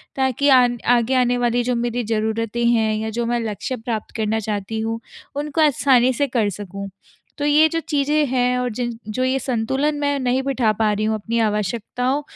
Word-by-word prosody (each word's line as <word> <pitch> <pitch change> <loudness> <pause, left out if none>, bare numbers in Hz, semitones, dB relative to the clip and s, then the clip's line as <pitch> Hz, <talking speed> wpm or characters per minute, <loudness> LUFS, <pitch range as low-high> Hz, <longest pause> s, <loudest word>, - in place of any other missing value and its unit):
ताकि 265 +1 +1
आन 245 -1 +2 0.2
आगे 240 +3 0
आने 245 0 +1
वाली 245 0 +1
जो 250 0 0
मेरी 240 0 -1
ज़रूरतें 220 +2 -1
हैं 225 -2 +2
या 220 +1 -3
जो 235 +2 -2
मैं 240 0 0
लक्ष्य 210 +5 -4
प्राप्त 225 -2 -5
करना 220 0 0
चाहती 210 +1 -3
हूँ 225 +1 -2 0.4
उनको 295 +2 -1
आसानी 260 -3 +4
से 285 +3 0
कर 230 -5 0
सकूँ। 200 0 -7 0.5
तो 290 - -2
ये 300 +2 +5
जो 330 - -1
चीज़ें 295 +1 +2
हैं 250 0 +1
और 250 - -1
जिन 240 +1 -2 0.2
जो 235 +4 -2
ये 260 +1 +1
संतुलन 265 +4 -1
मैं 285 -1 0
नहीं 255 0 +1
बिठा 260 -5 +1
पा 215 -1 +3
रही 210 +1 -1
हूँ 220 0 +1
अपनी 225 +2 -2
आवश्यकताओं 235 +6 -1
240 Hz, 195 wpm, -21 LUFS, 220-265 Hz, 0.5 s, ये